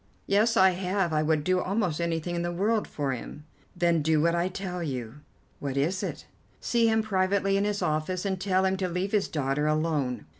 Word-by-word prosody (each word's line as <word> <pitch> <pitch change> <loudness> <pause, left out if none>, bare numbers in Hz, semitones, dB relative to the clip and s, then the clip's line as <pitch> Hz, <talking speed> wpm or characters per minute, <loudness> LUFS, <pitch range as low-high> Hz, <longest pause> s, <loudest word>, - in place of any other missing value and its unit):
"Yes, 215 +4 +2
I 190 0 +6
have. 185 -1 -1
I 155 - +2
would 155 -1 +1
do 185 +2 +2
almost 180 -4 -1
anything 170 0 -2
in 170 - -1
the 175 0 -2
world 210 +5 0
for 140 -2 -2
him." 130 +4 -7 0.3
"Then 170 -2 +2
do 155 +1 +2
what 170 +2 +3
I 170 +1 +1
tell 185 -1 -5
you." 130 -5 -4 0.4
"What 140 -1 -3
is 170 +7 0
it?" - - -5 0.3
"See 235 -1 +2
him 220 0 +2
privately 195 -1 +1
in 200 +1 +1
his 205 -1 -1
office, 155 +5 -1
and 190 -2 -2
tell 190 -1 +2
him 190 0 +1
to 185 -1 -1
leave 180 +3 -2
his 210 -2 +1
daughter 145 0 -1
alone. 155 -6 0
180 Hz, 210 wpm, -27 LUFS, 155-195 Hz, 0.4 s, I